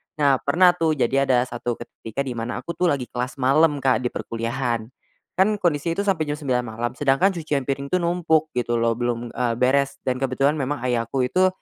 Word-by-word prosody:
Nah 140 Hz, -4 st, +3 dB
pernah 175 Hz, +5 st, +4 dB
tuh 165 Hz, -3 st, 0 dB
jadi 135 Hz, +1 st, +1 dB
ada 125 Hz, -2 st, +3 dB
satu 120 Hz, -1 st, -4 dB
ketika 120 Hz, +2 st, -6 dB
di 130 Hz, -, -5 dB
mana 115 Hz, 0 st, -4 dB
aku 170 Hz, -, -4 dB
tuh 180 Hz, +1 st, 0 dB
lagi 140 Hz, -5 st, +1 dB
kelas 125 Hz, +1 st, -3 dB
malam 140 Hz, +2 st, +3 dB
Kak 130 Hz, -4 st, +3 dB
di 125 Hz, -, -1 dB
perkuliahan. 115 Hz, -1 st, -3 dB, 0.5 s
Kan, 210 Hz, +2 st, +4 dB
kondisi 170 Hz, -3 st, 0 dB
itu 200 Hz, -, -1 dB
sampe 175 Hz, -7 st, 0 dB
jam 145 Hz, -, -1 dB
9 125 Hz, -5 st, -1 dB
malam 120 Hz, +1 st, -2 dB
sedangkan 140 Hz, +8 st, +2 dB
cucian 155 Hz, -6 st, -2 dB
piring 140 Hz, +1 st, -3 dB
tuh 185 Hz, -, 0 dB
numpuk 160 Hz, -3 st, +1 dB
gitu 120 Hz, -1 st, -1 dB
loh 115 Hz, 0 st, +2 dB
belum, 120 Hz, 0 st, -3 dB
eee, 120 Hz, -2 st, 0 dB
beres 135 Hz, +2 st, +2 dB
dan 130 Hz, -1 st, -1 dB
kebetulan 135 Hz, +1 st, +1 dB
memang 135 Hz, -1 st, -2 dB
ayahku 125 Hz, +1 st, 0 dB
itu, 185 Hz, +9 st, +3 dB
135 Hz, 200 wpm, -23 LUFS, 120-155 Hz, 0.5 s, pernah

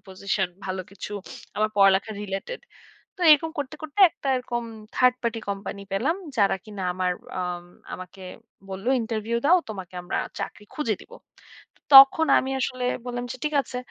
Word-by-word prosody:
Position 190 Hz, 0 st, -2 dB, 0.2 s
ভালো 185 Hz, 0 st, -3 dB
কিছু 200 Hz, +1 st, -8 dB, 0.4 s
আমার 215 Hz, +1 st, +2 dB
পড়ালেখা 195 Hz, +1 st, +4 dB
রিলেটেড। 200 Hz, -, -5 dB, 0.6 s
তো -, -, -4 dB
এরকম 320 Hz, +2 st, +3 dB
করতে 290 Hz, +1 st, -3 dB
করতে 315 Hz, +5 st, -4 dB
একটা 275 Hz, -, -7 dB
এরকম 240 Hz, -1 st, -3 dB, 0.3 s
3rd 250 Hz, -1 st, +4 dB
party 230 Hz, -1 st, -1 dB
কোম্পানি 200 Hz, 0 st, -5 dB
পেলাম। 265 Hz, -, +1 dB, 0.2 s
যারা 200 Hz, -3 st, +3 dB
কিনা 205 Hz, -3 st, -7 dB
আমার 185 Hz, -1 st, 0 dB, 0.3 s
আ -, -, -1 dB, 0.5 s
আমাকে 185 Hz, +1 st, -10 dB, 0.5 s
বলল 195 Hz, +3 st, -7 dB
ইন্টারভিউ 225 Hz, 0 st, -2 dB
দাও। 360 Hz, +4 st, +6 dB
তোমাকে 190 Hz, -3 st, -8 dB
আমরা 175 Hz, -, -2 dB, 0.2 s
চাকরি 210 Hz, -, -6 dB
খুঁজে 230 Hz, -8 st, 0 dB
দিবো। -, -, -14 dB, 0.8 s
তখন 275 Hz, +4 st, +10 dB
আমি 265 Hz, -, -2 dB
আসলে 255 Hz, -1 st, -2 dB, 0.2 s
বললাম 245 Hz, 0 st, -3 dB
যে 255 Hz, -, -8 dB
ঠিক 300 Hz, 0 st, -1 dB
আছে। 250 Hz, -, -8 dB
225 Hz, 155 wpm, -25 LUFS, 195-270 Hz, 0.8 s, তখন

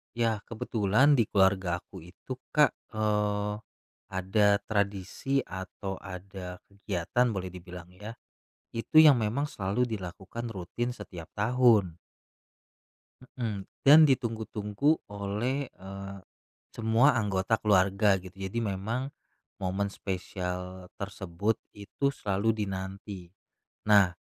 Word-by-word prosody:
Ya, 115 Hz, -3 st, +1 dB
kebetulan 110 Hz, +4 st, +2 dB
di 120 Hz, -7 st, +4 dB
keluargaku 95 Hz, -1 st, +1 dB
itu, 95 Hz, +9 st, -9 dB, 0.2 s
Kak, 150 Hz, -3 st, +6 dB, 0.2 s
eee, 105 Hz, -1 st, +1 dB, 0.5 s
ada 95 Hz, +3 st, +2 dB, 0.2 s
tradisi 100 Hz, +6 st, -1 dB
atau 95 Hz, +1 st, -6 dB
ada 90 Hz, -1 st, -8 dB, 0.2 s
kegiatan, 100 Hz, +4 st, 0 dB
boleh 95 Hz, -2 st, -4 dB
dibilang 90 Hz, -1 st, -10 dB
ya, 105 Hz, +5 st, -9 dB, 0.6 s
itu 115 Hz, +7 st, +4 dB
yang 150 Hz, -4 st, +9 dB
memang 120 Hz, +6 st, 0 dB
selalu 105 Hz, +2 st, -1 dB
dilakukan 105 Hz, +2 st, -6 dB
rutin 110 Hz, +6 st, -3 dB
setiap 90 Hz, -9 st, -9 dB
tahun. 110 Hz, -6 st, +4 dB, 1.3 s
Mhm, 115 Hz, -6 st, -4 dB, 0.2 s
dan 155 Hz, +3 st, +10 dB
ditunggu-tunggu 115 Hz, +1 st, +1 dB
oleh, 105 Hz, +7 st, -2 dB
eee, 100 Hz, +1 st, -8 dB, 0.6 s
semua 115 Hz, +5 st, +4 dB
anggota 105 Hz, -1 st, +1 dB
keluarga 100 Hz, -1 st, +3 dB
gitu, 90 Hz, 0 st, -12 dB
jadi 95 Hz, +4 st, -3 dB, 0.2 s
memang 115 Hz, +7 st, -2 dB, 0.5 s
momen 95 Hz, +1 st, -1 dB
spesial 90 Hz, -1 st, -5 dB
tersebut 100 Hz, +1 st, -2 dB, 0.2 s
itu 110 Hz, +7 st, -2 dB
selalu 100 Hz, -2 st, 0 dB
dinanti. 95 Hz, -1 st, -6 dB, 0.6 s
Nah, 100 Hz, -4 st, +6 dB
100 Hz, 100 wpm, -29 LUFS, 95-115 Hz, 1.3 s, dan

